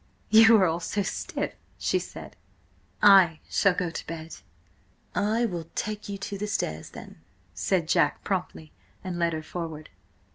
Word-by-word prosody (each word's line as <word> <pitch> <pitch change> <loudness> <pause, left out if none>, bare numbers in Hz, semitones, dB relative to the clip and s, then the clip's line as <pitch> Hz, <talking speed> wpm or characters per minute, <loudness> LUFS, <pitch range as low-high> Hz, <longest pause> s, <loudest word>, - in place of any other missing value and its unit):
"You 225 +1 +8
are 190 - +4
all 165 -1 0
so 195 +4 -2
stiff!" - - -3 0.2
she - - 0
said - - -10 0.7
"I 190 -6 +7
shall 195 -3 +2
go 175 -2 -2
to - - -7
bed!" 165 -1 -7 0.8
"I 220 +4 +1
will 175 -7 -4
take 210 -1 -4
you 200 - -4
to 195 0 -6
the 210 - -2
stairs 80 - -3
then," - - -12 0.3
said 165 - 0
Jack - - +2
promptly, 80 -1 -3 0.3
and 180 -2 -4
led 170 -1 +1
her 155 0 -4
forward. 160 -2 -6
180 Hz, 155 wpm, -27 LUFS, 160-205 Hz, 0.8 s, You